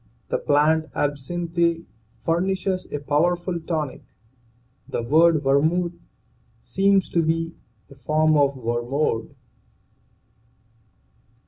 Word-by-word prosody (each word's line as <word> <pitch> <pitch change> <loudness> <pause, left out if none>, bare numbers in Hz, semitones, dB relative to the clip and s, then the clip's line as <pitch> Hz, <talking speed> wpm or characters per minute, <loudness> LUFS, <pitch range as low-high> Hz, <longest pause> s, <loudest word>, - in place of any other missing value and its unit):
The - - 0
plant 155 +2 +2
(absinthe) 170 +4 -1 0.4
furnishes 185 +2 -1
a - - -2
powerful 170 +5 0
tonic. 160 -4 -3 0.9
The 120 - -2
word 160 +4 +4
vermuth 160 +6 +2 0.7
seems 195 +6 +2
to 170 - +1
be 165 +1 -1 0.3
a - - -15
form 155 +4 +1
of 140 -1 +3
wermod. 120 0 -2
160 Hz, 90 wpm, -23 LUFS, 145-170 Hz, 0.9 s, word